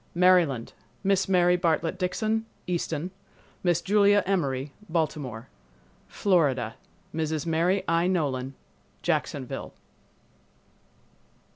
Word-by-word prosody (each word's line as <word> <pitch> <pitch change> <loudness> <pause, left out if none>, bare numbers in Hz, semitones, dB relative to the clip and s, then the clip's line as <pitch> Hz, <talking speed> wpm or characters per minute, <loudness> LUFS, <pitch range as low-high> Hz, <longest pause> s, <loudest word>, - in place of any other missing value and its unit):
Maryland—Miss 180 - +2
Mary 180 -1 +4
Bartlett 170 -1 0
Dixon, 215 +4 -1 0.2
Easton; 170 -1 -2 0.5
Miss 175 -2 +2
Julia 205 0 +4
Emory, 140 -8 -1 0.2
Baltimore. 145 -8 -2 0.6
Florida—Mrs. 155 - -1
Mary 170 +4 +1
I. 165 +1 +2
Nolan, 135 -7 -1 0.5
Jacksonville. - - -2
170 Hz, 75 wpm, -27 LUFS, 145-185 Hz, 0.6 s, Mary